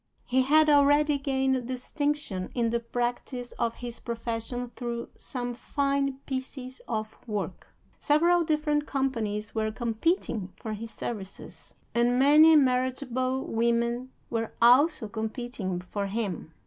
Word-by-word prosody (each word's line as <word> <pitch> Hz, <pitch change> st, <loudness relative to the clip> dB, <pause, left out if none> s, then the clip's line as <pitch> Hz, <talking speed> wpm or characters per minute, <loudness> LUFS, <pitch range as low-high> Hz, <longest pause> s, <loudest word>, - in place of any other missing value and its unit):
He 260 Hz, +1 st, +2 dB
had 305 Hz, +4 st, +5 dB
already 290 Hz, 0 st, +5 dB
gained 265 Hz, -2 st, 0 dB
distinction 260 Hz, -6 st, -2 dB
in 235 Hz, -2 st, +1 dB
the 235 Hz, -, +1 dB
practice 245 Hz, +1 st, -3 dB
of 230 Hz, -1 st, 0 dB
his 240 Hz, -1 st, -7 dB
profession 235 Hz, +1 st, -4 dB
through 235 Hz, -1 st, -4 dB
some 245 Hz, -2 st, -4 dB
fine 275 Hz, +2 st, -1 dB
pieces 260 Hz, -1 st, -5 dB
of 215 Hz, -1 st, -3 dB
work. 205 Hz, -4 st, -4 dB, 0.3 s
Several 340 Hz, +4 st, +4 dB
different 300 Hz, -2 st, 0 dB
companies 225 Hz, -6 st, -2 dB
were 220 Hz, -1 st, 0 dB
competing 225 Hz, -, -1 dB
for 220 Hz, -, -5 dB
his 225 Hz, +2 st, -6 dB
services, 210 Hz, -2 st, -7 dB, 0.2 s
and 240 Hz, +1 st, +3 dB
many 300 Hz, +4 st, +7 dB
marriageable 255 Hz, -1 st, +1 dB
women 235 Hz, +2 st, 0 dB, 0.2 s
were 225 Hz, -1 st, -2 dB
also 255 Hz, +2 st, +5 dB
competing 220 Hz, -3 st, -4 dB
for 200 Hz, +3 st, -4 dB
him. 195 Hz, -6 st, -3 dB
245 Hz, 120 wpm, -28 LUFS, 225-275 Hz, 0.3 s, many